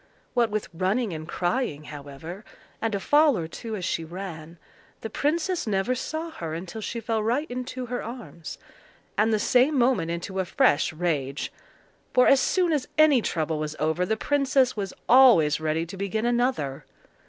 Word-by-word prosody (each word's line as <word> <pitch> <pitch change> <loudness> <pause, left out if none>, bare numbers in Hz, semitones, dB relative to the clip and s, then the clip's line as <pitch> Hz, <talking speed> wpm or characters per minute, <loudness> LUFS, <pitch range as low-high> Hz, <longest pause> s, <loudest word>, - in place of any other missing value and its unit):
What 240 -2 +2
with 215 0 -2
running 190 +5 0
and 155 0 -6
crying, 175 - -1
however, 150 +6 -9 0.4
and 225 -2 0
a - - -1
fall 295 +3 +4
or 165 -2 -3
two 220 +6 -6
as 185 -4 -4
she 165 - -1
ran, 170 -1 -8 0.4
the 225 - -6
princess 330 - 0
never 200 +4 +1
saw 315 +6 -4
her 160 - -5
until 180 +6 -6
she 235 - -4
fell 225 -1 -1
right 240 +8 0
into 255 0 -4
her 245 +1 -3
arms—and 220 -1 -5
the 215 - +3
same 255 +7 +3
moment 240 -10 +2
into 170 +3 -4
a 190 - 0
fresh 160 -1 +2
rage; 150 -5 -2 0.6
for 250 - +6
as 275 - +6
soon 355 +3 +2
as 285 -4 -1
any 305 -5 +6
trouble 160 -5 -1
was 155 0 -3
over 160 +3 0
the 220 +4 0
princess 275 -1 +2
was 195 -3 -3 0.2
always 230 - +6
ready 155 +1 -1
to 180 +4 -9
begin 200 +3 -2
another. 240 - 0
210 Hz, 170 wpm, -26 LUFS, 165-250 Hz, 0.6 s, for